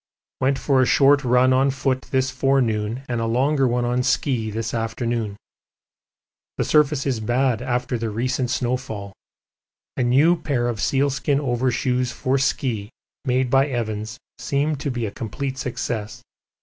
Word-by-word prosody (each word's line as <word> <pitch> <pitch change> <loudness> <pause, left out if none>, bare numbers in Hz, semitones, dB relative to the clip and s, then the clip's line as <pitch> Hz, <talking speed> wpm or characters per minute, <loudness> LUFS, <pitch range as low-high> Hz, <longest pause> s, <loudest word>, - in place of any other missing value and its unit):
Went 135 +1 +2
for 135 0 +2
a - - +4
short 140 +1 +5
run 125 +1 +4
on 135 +2 +3
foot 130 -1 -1
this 130 -1 +1
forenoon 125 -3 0
and 120 -2 -2
a 115 - -1
longer 135 +4 +2
one 120 0 0
on 125 +1 +1
ski 125 -3 0
this 110 +1 -4
afternoon. 115 -2 -2 1.2
The - - +1
surface 150 -2 +3
is 130 -5 0
bad 120 +1 +1
after 125 -1 -1
the 115 -1 -2
recent 125 +3 -1
snowfall. 120 -6 -3 0.8
A - - -2
new 140 +8 +4
pair 130 -6 0
of 115 -3 -3
sealskin 140 +1 +1
overshoes 125 -1 0
for 130 +3 0
ski 115 -6 -1 0.4
made 130 -1 +1
by 135 +1 +4
Evans 110 -3 -3 0.2
seem 140 +4 0
to 140 - -3
be 120 -3 -2
a 100 - -4
complete 130 +4 -5
success. 120 -2 -4
125 Hz, 150 wpm, -22 LUFS, 115-135 Hz, 1.2 s, short